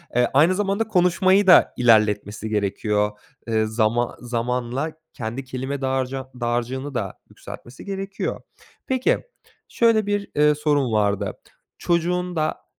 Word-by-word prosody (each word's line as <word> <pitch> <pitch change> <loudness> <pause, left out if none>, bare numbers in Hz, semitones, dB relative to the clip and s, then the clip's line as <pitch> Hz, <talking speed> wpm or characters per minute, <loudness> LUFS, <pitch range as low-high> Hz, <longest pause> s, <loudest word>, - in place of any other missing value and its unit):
eee, 125 0 +4
aynı 160 +7 +5
zamanda 205 +2 0
konuşmayı 185 +1 +3
da 180 - +7
ilerletmesi 110 -2 +2
gerekiyor. 105 0 0 0.4
Eee, 110 -1 +1
zaman 110 +2 0
zamanla 125 +4 -2 0.2
kendi 120 +2 -5
kelime 130 +2 -5
dağarca 130 0 -2
dağacığını 125 +4 -2
da 100 -6 -4
yükseltmesi 120 +2 -11
gerekiyor. 195 0 -4 0.5
Peki, 260 -1 +1 0.4
şöyle 225 -3 +2
bir, 205 0 -2
ııı, 150 0 +4
sorum 145 -5 +1
vardı: 100 -2 +1 0.4
Çocuğunda 175 -1 -1
130 Hz, 115 wpm, -22 LUFS, 115-180 Hz, 0.5 s, da